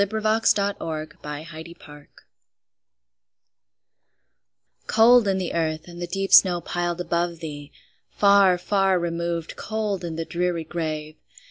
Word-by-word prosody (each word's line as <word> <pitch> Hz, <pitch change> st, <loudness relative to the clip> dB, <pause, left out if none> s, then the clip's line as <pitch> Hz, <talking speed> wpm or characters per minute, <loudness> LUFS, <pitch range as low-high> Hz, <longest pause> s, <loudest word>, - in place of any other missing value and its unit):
Emily 210 Hz, +2 st, -1 dB
Brontë 215 Hz, -2 st, +1 dB, 0.8 s
Remembrance 150 Hz, -3 st, -13 dB, 2.8 s
COLD 235 Hz, 0 st, +5 dB
in 195 Hz, -1 st, +1 dB
the 185 Hz, -2 st, -3 dB
earth, 160 Hz, -1 st, -2 dB
and 175 Hz, 0 st, -10 dB
the 175 Hz, -, -3 dB
deep 195 Hz, +1 st, -3 dB
snow 180 Hz, -2 st, +7 dB
piled 175 Hz, 0 st, -3 dB
above 170 Hz, -1 st, -2 dB
thee! 145 Hz, -3 st, -8 dB, 0.4 s
Far, 200 Hz, -2 st, +4 dB
far 195 Hz, 0 st, +1 dB
removed, 170 Hz, -1 st, -3 dB
cold 215 Hz, -4 st, -3 dB
in 165 Hz, -2 st, -5 dB
the 165 Hz, 0 st, -4 dB
dreary 175 Hz, -1 st, -2 dB
grave! 155 Hz, -2 st, -5 dB
175 Hz, 115 wpm, -23 LUFS, 165-200 Hz, 2.8 s, snow